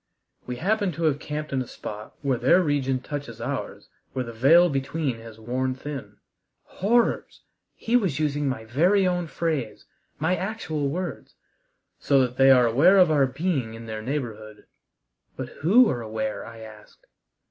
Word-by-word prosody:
We 125 - -3
happen 200 - 0
to 165 +3 -5
have 150 -3 +2
camped 150 -1 -5
in 130 - +1
a 125 - -5
spot 105 0 -8
where 135 -4 0
their 135 +8 +5
region 135 -4 0
touches 140 -6 -6
ours - - -5 0.3
where 130 -1 -2
the 115 - -8
veil 155 +10 +6
between 135 -3 -2
has 115 -1 -12
worn 130 +3 -2
thin" 140 0 -8 0.5
horrors! 230 +5 0 0.3
he 230 - -1
was 190 - +2
using 145 -2 0
my 110 -4 -4
very 175 - +3
own 180 -2 0
phrase, 155 -9 -3 0.3
my 160 +5 +1
actual 170 -9 -3
words 180 +5 -5 0.6
"so 140 -1 +3
that 125 0 -1
they 135 0 +6
are 125 -2 +7
aware 145 - +5
of 180 -4 +6
our 140 -3 +4
being 130 -5 -2
in 115 0 -9
their 110 -1 -5
neighborhood." 110 -5 -5 0.7
"But - - -5
who 220 - +6
are 120 - -3
aware?" 110 -1 -4
I 115 -1 -11
asked. 110 -1 -14
140 Hz, 165 wpm, -25 LUFS, 120-165 Hz, 0.7 s, are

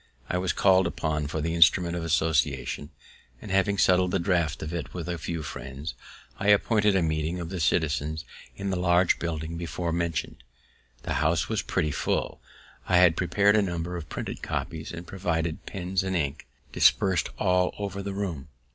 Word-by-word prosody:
I 90 - 0
was 90 0 0
call'd 95 -2 +4
upon 75 -3 -2
for 75 +2 -3
the 80 +2 -1
instrument 85 +1 +5
of 85 - -3
association, 75 -4 0 0.5
and 105 - -8
having 100 +1 +2
settled 90 -1 +4
the 95 - +1
draft 85 -5 0
of 75 +2 -5
it 80 -5 -5
with 85 -2 -4
a 85 -1 -3
few 85 0 -4
friends, 70 +2 -6 0.5
I 100 - -2
appointed 105 0 +4
a 95 - +3
meeting 80 +2 -1
of 85 -1 -5
the 95 -1 -4
citizens 80 -1 0 0.3
in 100 -1 -3
the 95 - -1
large 90 0 +3
building 80 -1 -3
before 85 0 -3
mentioned. 85 -3 -2 0.7
The - - -2
house 80 0 +1
was - - 0
pretty 75 - -1
full; - - -2 0.5
I 90 - +4
had 90 -2 +6
prepared 100 +4 +3
a 110 - +5
number 90 -2 -3
of 85 -3 -7
printed - - -5
copies, 80 -1 -4
and 85 0 -7
provided 85 -4 -2
pens 95 -1 -2
and 95 0 -2
ink 70 -3 -2 0.2
dispers'd 95 -2 +3
all 90 -2 +2
over 100 -1 -4
the 100 0 -4
room. 85 -9 -4
85 Hz, 180 wpm, -27 LUFS, 80-95 Hz, 0.7 s, had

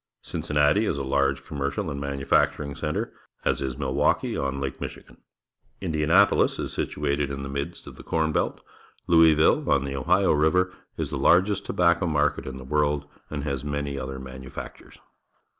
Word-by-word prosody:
Cincinnati 75 +9 +1
is 70 - -1
a 70 - -2
large 70 +1 0
commercial 70 -1 -3
and 70 0 -5
manufacturing 70 +1 +1
centre, 75 +1 -3 0.3
as - - +1
is 65 -2 -2
also 70 +2 -5
Milwaukee 65 0 +1
on 70 0 -2
Lake 70 -1 -4
Michigan. - - -8 0.6
Indianapolis 85 +3 +3
is - - -4
situated 70 -1 -1
in 70 0 -5
the 70 - -5
midst 70 0 -4
of - - -11
the - - -11
corn 80 -1 0
belt. - - -1 0.5
Louismlle, 80 -2 +5
on 70 0 +3
the 70 0 -4
Ohio 90 +9 +3
River, 90 +5 +2 0.2
is - - -3
the - - -2
largest 100 +3 +3
tobacco 85 0 +2
market 75 -3 +1
in 65 0 -6
the 65 - -9
world 75 +1 0 0.2
and 75 -2 -4
has 70 -3 -3
manj'^ 70 -1 -3
other 65 0 -5
manufactures. 65 0 -9
70 Hz, 165 wpm, -25 LUFS, 70-80 Hz, 0.6 s, Louismlle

